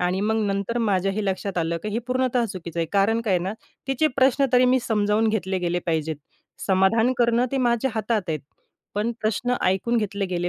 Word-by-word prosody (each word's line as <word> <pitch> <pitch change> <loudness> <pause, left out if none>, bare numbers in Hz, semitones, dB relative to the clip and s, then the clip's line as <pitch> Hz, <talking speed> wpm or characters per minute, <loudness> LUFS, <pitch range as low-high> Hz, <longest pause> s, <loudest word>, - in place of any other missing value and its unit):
आणि 180 +2 0
मग 220 +2 +1
नंतर 200 +4 -1
माझ्याही 195 -1 0
लक्षात 195 -1 -2
आलं 170 0 -1
की - - -3
हे 215 - -1
पूर्णतः 255 -1 +1
चुकीच 170 -3 -8
आहे. 165 -1 0
कारण 210 +3 +3
काय 210 -5 +1
आहे 175 - +1
ना, 190 - -2 0.4
तिचे 270 +4 +2
प्रश्न 270 +1 +4
तरी 250 0 +5
मी 255 +1 +4
समजावून 215 0 +1
घेतले 190 -3 -1
गेले 175 +1 0
पाहिजेत. 160 -2 -1 0.5
समाधान 195 +6 +3
करणं 235 0 +3
ते 270 - +1
माझ्या 245 +1 +1
हातात 220 0 0
आहे. 155 - -1 0.6
पण 215 +3 0
प्रश्न 220 +4 0
ऐकून 195 +6 +1
घेतले 200 -3 -1
गेले 175 -1 -2
210 Hz, 195 wpm, -24 LUFS, 185-235 Hz, 0.6 s, तरी